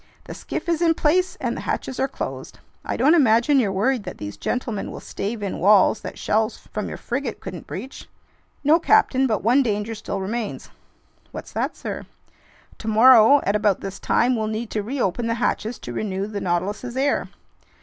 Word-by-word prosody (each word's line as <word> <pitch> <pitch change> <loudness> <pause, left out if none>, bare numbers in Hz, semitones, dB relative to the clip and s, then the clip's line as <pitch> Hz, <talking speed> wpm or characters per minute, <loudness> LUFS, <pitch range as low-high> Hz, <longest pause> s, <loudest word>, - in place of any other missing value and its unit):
"The - - -8
skiff - - -6
is 335 -1 0
in 330 -1 +3
place 360 +5 +1
and - - -2
the - - -5
hatches 260 - -3
are 270 - +2
closed. - - -6 0.3
I - - -3
don't 275 +7 +4
imagine 265 -2 +4
you're 210 -6 +1
worried 225 +6 +1
that - - -7
these 100 0 -6
gentlemen 220 - -3
will - - -7
stave 210 +2 -5
in 195 - -3
walls 205 +2 +5
that - - -7
shells 220 +1 0
from 210 - -6
your - - -6
frigate 245 -2 -4
couldn't 180 -4 -8
breach?" 250 +8 -8 0.5
"No, 305 +4 +5
captain, 315 -9 +3
but 215 -5 -1
one 245 +6 +4
danger 210 -2 -1
still 205 -2 -5
remains." 210 +3 -4 0.6
"What's - - -8
that, - - -2
sir?" - - -6 0.7
"Tomorrow 230 +4 +6
at 200 - 0
about 205 -2 +1
this 195 0 -6
time, 250 +1 +2
we'll 220 -1 -1
need 220 +1 -4
to 215 - -1
reopen 235 -1 -2
the 230 - 0
hatches 230 -1 -1
to 120 - -8
renew 195 - -2
the 205 -1 -5
Nautilus's 205 +8 -2
air." 280 +2 0
225 Hz, 185 wpm, -23 LUFS, 205-260 Hz, 0.7 s, Tomorrow